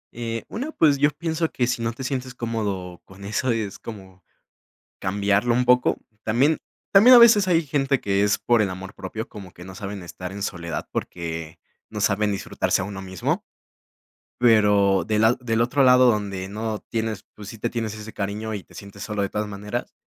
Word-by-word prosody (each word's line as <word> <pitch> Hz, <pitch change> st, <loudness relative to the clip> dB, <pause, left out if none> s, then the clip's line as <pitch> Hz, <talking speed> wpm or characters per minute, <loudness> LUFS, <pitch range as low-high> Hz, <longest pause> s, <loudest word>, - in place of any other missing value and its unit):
Eh, 115 Hz, -1 st, -4 dB
una, 270 Hz, +8 st, -5 dB
pues, 145 Hz, -, +3 dB
yo 145 Hz, +1 st, +5 dB
pienso 160 Hz, +1 st, -2 dB
que 125 Hz, -, 0 dB
si 120 Hz, -1 st, -1 dB
no 115 Hz, 0 st, 0 dB
te 115 Hz, +3 st, -8 dB
sientes 130 Hz, -1 st, -3 dB
cómodo 100 Hz, -7 st, -3 dB
con 95 Hz, +1 st, -14 dB
eso, 110 Hz, +5 st, -1 dB
es 110 Hz, -4 st, -3 dB
como 95 Hz, -4 st, -11 dB, 0.8 s
cambiarlo 100 Hz, +4 st, +1 dB
un 125 Hz, +1 st, +2 dB
poco. 125 Hz, 0 st, +4 dB, 0.3 s
También, 130 Hz, +8 st, +2 dB, 0.3 s
también 220 Hz, +6 st, +8 dB
a -, -, +11 dB
veces 220 Hz, -4 st, +7 dB
hay 170 Hz, -3 st, +3 dB
gente 135 Hz, -2 st, 0 dB
que 100 Hz, 0 st, +1 dB
es 105 Hz, 0 st, +2 dB
por 120 Hz, -2 st, +2 dB
el 105 Hz, -, +2 dB
amor 95 Hz, +1 st, -8 dB
propio, 110 Hz, +1 st, -6 dB
como 95 Hz, -3 st, -11 dB
que 90 Hz, -, -13 dB
no 95 Hz, 0 st, -10 dB
saben 100 Hz, -1 st, -6 dB
estar 90 Hz, +1 st, -7 dB
en 100 Hz, +1 st, -6 dB
soledad 85 Hz, -6 st, -4 dB
porque 80 Hz, -2 st, -5 dB, 0.3 s
no 105 Hz, -, -6 dB
saben 105 Hz, 0 st, +2 dB
disfrutarse 95 Hz, -, -1 dB
a -, -, -2 dB
uno 95 Hz, 0 st, -6 dB
mismo. 95 Hz, -2 st, -2 dB, 1.0 s
Pero 105 Hz, -5 st, +4 dB
de 105 Hz, -1 st, 0 dB
lad 110 Hz, +2 st, +4 dB
del 115 Hz, -2 st, 0 dB
otro 130 Hz, +4 st, +2 dB
lado, 125 Hz, 0 st, +6 dB
donde 100 Hz, -4 st, -2 dB
no 110 Hz, +1 st, -3 dB
tienes 110 Hz, -3 st, -3 dB
pues, 105 Hz, -2 st, -9 dB
sí 115 Hz, -, -9 dB
te 120 Hz, -, -1 dB
tienes 115 Hz, -3 st, -3 dB
ese 110 Hz, +1 st, -9 dB
cariño 105 Hz, +2 st, -3 dB
y 100 Hz, -3 st, -5 dB
te -, -, -21 dB
sientes 100 Hz, -1 st, -9 dB
solo, 105 Hz, -1 st, -3 dB
de 100 Hz, -, -1 dB
todas 105 Hz, +1 st, -2 dB
maneras. 105 Hz, +4 st, -5 dB
110 Hz, 195 wpm, -23 LUFS, 100-125 Hz, 1.0 s, a